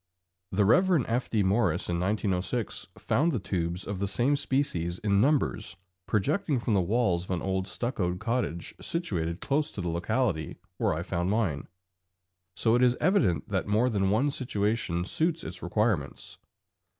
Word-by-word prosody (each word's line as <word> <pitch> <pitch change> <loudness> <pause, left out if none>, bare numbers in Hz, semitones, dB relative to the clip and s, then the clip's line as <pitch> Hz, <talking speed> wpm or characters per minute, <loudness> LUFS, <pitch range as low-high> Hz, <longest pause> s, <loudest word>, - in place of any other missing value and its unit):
The 100 +1 +2
Rev. 175 - +4
F. 120 +3 -1
D. 110 -3 +2
Morice 100 -1 +1
in 85 -1 -1
1906 100 +3 -1
found 165 +5 +1
the 130 - 0
tubes 90 -2 -2
of 100 -2 -4
the 100 - 0
same 120 +8 +2
species 130 - -1
in 100 -1 +2
numbers 140 - +1 0.3
projecting 145 - +1
from 115 -1 -1
the 100 - +4
walls 95 -3 +1
of - - -18
an 90 -2 -1
old 95 0 -1
stuccoed 90 -4 -2
cottage 115 -6 -2
situated 85 - -2
close 150 +2 0
to - - -7
the 90 -2 -2
locality 85 - -1 0.2
where - - +1
I 80 - -3
found 90 -1 -1
mine, 95 -10 0 0.9
so 115 - +2
it 120 - +4
is 125 -1 +4
evident 100 - +2
that - - -1
more 110 +5 +2
than 95 -3 +1
one 130 +8 +2
situation 105 -8 -1
suits 165 - 0
its - - -6
requirements. 95 -5 -1
105 Hz, 160 wpm, -28 LUFS, 90-125 Hz, 0.9 s, Rev